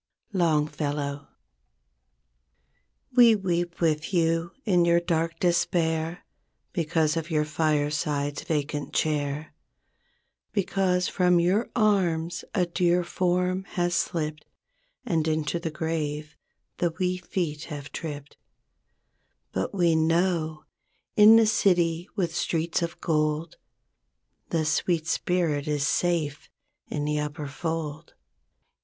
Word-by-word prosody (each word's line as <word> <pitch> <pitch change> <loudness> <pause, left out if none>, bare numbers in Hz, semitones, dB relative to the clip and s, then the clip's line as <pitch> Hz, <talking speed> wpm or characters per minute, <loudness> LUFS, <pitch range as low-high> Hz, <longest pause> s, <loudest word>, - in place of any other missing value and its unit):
—Longfellow. 150 -4 0 1.9
We 235 -3 +8
weep 175 -3 -2
with 155 -1 0
you 165 -1 +1 0.2
in 180 -5 +4
your 170 0 +4
dark 165 -1 -1
despair, 165 -1 0 0.5
Because 160 -2 +1
of 165 +1 -3
your 155 -2 +1
fireside's 150 -1 0
vacant 145 -2 -3
chair; 150 0 -1 1.0
Because 185 -2 +1
from 180 -2 +3
your 190 +7 +2
arms 180 -7 +1
a 180 -4 +3
dear 175 0 +1
form 180 +1 0
has 175 -1 +1
slipped, 155 -2 -1 0.6
And 165 -8 0
into 155 +1 0
the 165 -1 -3
grave, 155 -1 -3 0.4
the 170 -2 0
wee 180 0 0
feet 170 -4 -3
have 145 -3 -7
tripped; 145 -3 -7 1.1
But 95 +1 -2
we 175 -4 +2
know, 160 -1 +1 0.5
in 215 +1 +9
the 225 0 +6
City 175 -5 +2
with 175 -5 -1
streets 170 0 0
of 170 0 -3
gold. 155 0 0 0.9
The 160 -2 0
sweet 160 +1 +1
spirit 165 -4 0
is 145 -2 0
safe 160 -3 0 0.4
in 145 -1 -3
the 150 0 0
upper 150 0 -4
fold. 160 +1 -4
165 Hz, 110 wpm, -26 LUFS, 150-175 Hz, 1.9 s, in